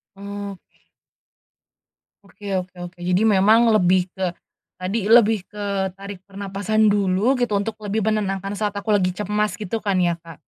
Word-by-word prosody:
Oke. 200 -1 -9 1.4
Oke 200 +1 -7
oke 185 0 -3
oke. 175 0 -15
Jadi 180 +3 +1
memang 215 +3 +5
lebih 185 -2 +3
ke 190 -1 -1 0.5
tadi 200 +3 -2
lebih 225 -3 +5
ke 200 -1 -3
tarik 200 -1 -8
pernafasan 200 +2 -1
dulu 200 +4 +2
gitu 245 -2 0
untuk 215 +2 -3
lebih 205 +1 -2
menenangkan 195 -2 -1
saat 210 -1 -2
aku 210 +1 0
lagi 185 -3 +2
cemas 210 +2 -1
gitu 215 +1 -4
kan 200 -2 +1
ya 175 -1 +2
Kak? 165 -2 -13
200 Hz, 150 wpm, -22 LUFS, 190-210 Hz, 1.4 s, memang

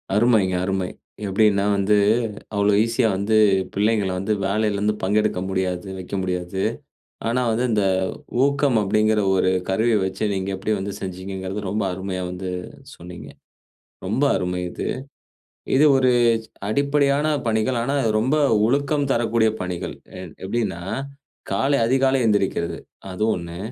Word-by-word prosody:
அருமைங்க, 105 -5 +3
அருமை. 95 -1 -1 0.4
எப்படீன்னா 100 0 +3
வந்து, 100 +2 +2 0.6
அவ்ளோ 100 0 +3
ஈஸியா 115 0 +1
வந்து 100 +3 0 0.4
பிள்ளைங்கள 105 -1 +1
வந்து, 105 +3 0
வேலையிலே 105 +1 0
வந்து 105 0 +2
பங்கெடுக்க 105 -1 +1
முடியாது, 95 0 -2
வைக்க 95 +2 -6
முடியாது. 90 +1 -3 0.7
ஆனா 120 +2 +1
வந்து, 120 +3 0
இந்த 105 -2 +2 0.6
ஊக்கம் 140 -4 +2
அப்படீங்குற 105 +2 +2 0.2
ஒரு 95 0 +2 0.2
கருவிய 110 +4 +2
வச்சு, 95 +3 -4
நீங்க 95 0 -2
எப்படி 105 +3 -2
வந்து 100 +1 -4
செஞ்சீங்கங்குறது, 95 +1 -5
ரொம்ப 105 +1 -1
அருமையா 95 0 -4
வந்து 90 0 -5 0.5
சொன்னீங்க. 90 0 -10 0.8
ரொம்ப 115 +9 0
அருமை 90 0 -2
இது. - - -5 0.9
இது 145 +3 +5
ஒரு 130 -1 +3 0.6
அடிப்படையான 140 +3 +2 0.2
பணிகள். 110 +3 +1
ஆனா, 135 +4 -1 0.2
ரொம்ப 130 +7 +1 0.3
ஒழுக்கம் 140 +3 +1
தரக்கூடிய 115 -1 +2
பணிகள். 90 -1 -4 0.3
ஏன் 90 -4 -9
எப்டீன்னா, 100 -4 -2 0.7
காலை 135 +8 +2
அதிகாலை 135 +1 +2
எந்திரிக்கிறது. 95 -6 0 0.3
அது 90 +3 -5
1. 85 0 -6
105 Hz, 125 wpm, -22 LUFS, 95-115 Hz, 0.9 s, இது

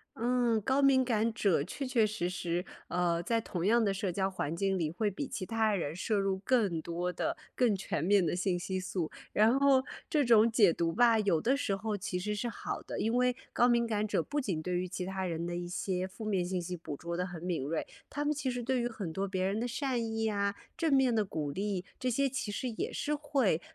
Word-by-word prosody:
嗯， 240 -1 +2
高 265 +6 +2
敏 270 -2 +5
感 230 -2 +1
者 195 -9 +2
确 275 - -5
确 245 -4 +3
实 210 -4 -2
实， 180 0 -2 0.2
呃， 175 -1 +1
在 230 +6 +1
同 180 -6 -3
样 235 +2 +4
的 200 -2 +2
社 195 -1 -2
交 190 +2 0
环 165 -4 -3
境 195 +2 0
里 160 -3 0
会 205 +6 -1
比 275 +9 -4
其 190 - -4
他 220 0 +1
人 160 -4 -2
摄 210 +4 0
入 195 -1 0
更 200 -6 +1
多 175 +2 -3
的 335 - -2 0.2
更 240 -5 +3
全 185 -5 -2
面 195 +1 +4
的 170 - 0
信 180 0 0
息 185 +2 -3
素。 185 -3 -3 0.2
然 225 +5 +4
后 275 -2 +5 0.3
这 300 -7 +2
种 230 -1 +6
解 205 -6 +5
读 165 0 0
吧， 230 +3 +4
有 195 -6 +2
的 245 - +2
时 230 -8 0
候 215 +2 -2
其 190 -2 -3
实 210 +4 -2
是 210 +3 -2
好 230 - -5
的， - - -6
因 225 - 0
为 250 0 +3 0.2
高 245 - +4
敏 235 -1 +3
感 215 -2 0
者 - - +1
不 290 0 -2
仅 190 - -2
对 180 +2 -1
于 180 +1 -1
其 180 0 -4
他 190 0 -3
人 170 -1 -2
的 175 0 -3
一 175 0 -4
些 185 +1 -2
负 215 +4 -9
面 195 -4 +1
信 180 +1 -2
息 180 +1 -4
捕 160 -4 -7
捉 170 +3 -4
得 180 - 0
很 175 -2 -8
敏 175 -6 -1
锐， 155 +4 -2 0.2
他 290 +1 -3
们 300 - +2
其 285 -3 -2
实 245 -1 -3
对 255 +1 +1
于 240 - 0
很 200 -8 -5
多 195 +3 -1
别 185 -1 -1
人 200 +3 0
的 240 - -1
善 250 -1 -1
意 225 0 -1
啊， 200 -1 0 0.2
正 325 -2 0
面 265 -2 +4
的 220 -2 +3
鼓 155 -7 -3
励， 195 +2 -2
这 255 - 0
些 275 +3 +2
其 255 -5 -3
实 250 +5 -2
也 225 - -3
是 300 - -1
会 275 - +1
205 Hz, 265 characters per minute, -31 LUFS, 180-240 Hz, 0.3 s, 种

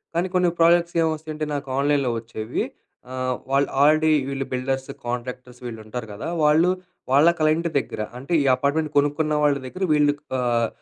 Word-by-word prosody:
కానీ 175 +2 +1
కొన్ని 180 -1 +4
ప్రాజెక్ట్స్ 170 +1 +4
ఏం 160 - +3
వస్తాయి 155 0 -7
అంటే 155 0 -2
నాకు 140 0 -5
ఆన్లైన్‌లో 140 -3 +2
వచ్చేవి 110 -1 -4 0.5
ఆహ్, 130 0 -1 0.2
వాళ్ళు 140 +1 +2
ఆల్రెడీ 155 +2 +5 0.2
వీళ్ళు 135 -1 -3
బిల్డర్స్, 130 +1 -2 0.2
కాంట్రాక్టర్స్ 125 +1 -5
వీళ్ళు 115 -2 -6
ఉంటారు 115 +1 -6
కదా! 105 - -6 0.2
వాళ్ళు 155 +4 +4 0.4
వాళ్ళ 145 +5 +6
క్లైంట్ 155 +2 +2
దగ్గర 110 - -6 0.2
అంటే 140 +7 -5
ఈ - - -2
అపార్ట్మెంట్ 145 +4 0
కొనుక్కున్న 145 +2 +2
వాళ్ళ 145 -1 +3
దగ్గర, 185 +9 -5
వీళ్ళు 145 -1 +4 0.2
ఆహ్, 120 -2 +1
140 Hz, 165 wpm, -23 LUFS, 125-155 Hz, 0.5 s, వాళ్ళ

